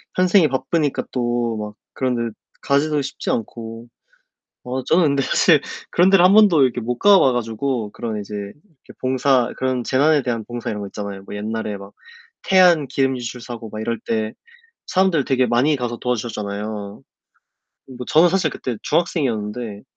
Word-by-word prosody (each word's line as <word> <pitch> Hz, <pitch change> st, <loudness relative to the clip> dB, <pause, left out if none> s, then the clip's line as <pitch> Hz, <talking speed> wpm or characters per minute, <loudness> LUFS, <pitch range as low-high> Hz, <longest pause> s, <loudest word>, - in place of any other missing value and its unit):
현생이 185 Hz, -2 st, +4 dB
바쁘니까 135 Hz, +3 st, -1 dB
또 120 Hz, -2 st, -1 dB
막 105 Hz, 0 st, -6 dB, 0.2 s
그런 130 Hz, -2 st, -1 dB
데 115 Hz, -2 st, -3 dB, 0.3 s
가기도 145 Hz, +1 st, +1 dB
쉽지 135 Hz, 0 st, -5 dB
않고. 115 Hz, 0 st, -4 dB, 0.8 s
어 130 Hz, +1 st, -4 dB
저는 170 Hz, +5 st, +3 dB
근데 140 Hz, -2 st, +2 dB
사실 -, -, +4 dB, 0.3 s
그런 180 Hz, +2 st, +4 dB
데를 195 Hz, -2 st, +5 dB
1 185 Hz, -, +6 dB
번도 205 Hz, -8 st, +6 dB
이렇게 125 Hz, -1 st, 0 dB
못 120 Hz, +2 st, -3 dB
가봐 195 Hz, -9 st, +6 dB
가지고 120 Hz, -1 st, -2 dB
그런 110 Hz, -1 st, -4 dB
이제 105 Hz, +1 st, -7 dB
이렇게 130 Hz, -, -11 dB
봉사 130 Hz, -1 st, +2 dB
그런 130 Hz, -1 st, -1 dB
재난에 145 Hz, +3 st, +3 dB
대한 120 Hz, -3 st, -2 dB
봉사 120 Hz, 0 st, -5 dB
이런 105 Hz, -1 st, -4 dB
거 100 Hz, -, -5 dB
있잖아요. 100 Hz, -1 st, -7 dB
뭐 -, -, -10 dB
옛날에 110 Hz, 0 st, -4 dB
막 100 Hz, 0 st, -12 dB, 0.5 s
태안 180 Hz, -6 st, +5 dB
기름 135 Hz, 0 st, 0 dB
유출 125 Hz, 0 st, -6 dB
사고 115 Hz, -2 st, -8 dB
막 110 Hz, -, -7 dB
이럴 115 Hz, +1 st, -2 dB
때 110 Hz, -1 st, -1 dB, 0.5 s
사람들 185 Hz, -6 st, +2 dB
되게 130 Hz, -1 st, +2 dB
많이 125 Hz, +6 st, +2 dB
가서 120 Hz, -2 st, -3 dB
도와주셨잖아요. 105 Hz, -3 st, -4 dB, 0.9 s
뭐 125 Hz, 0 st, -7 dB
저는 165 Hz, +3 st, +5 dB
사실 190 Hz, +2 st, +1 dB
그때 125 Hz, -3 st, -5 dB
중학생이었는데 115 Hz, -, -1 dB
125 Hz, 340 characters per minute, -21 LUFS, 110-145 Hz, 0.9 s, 1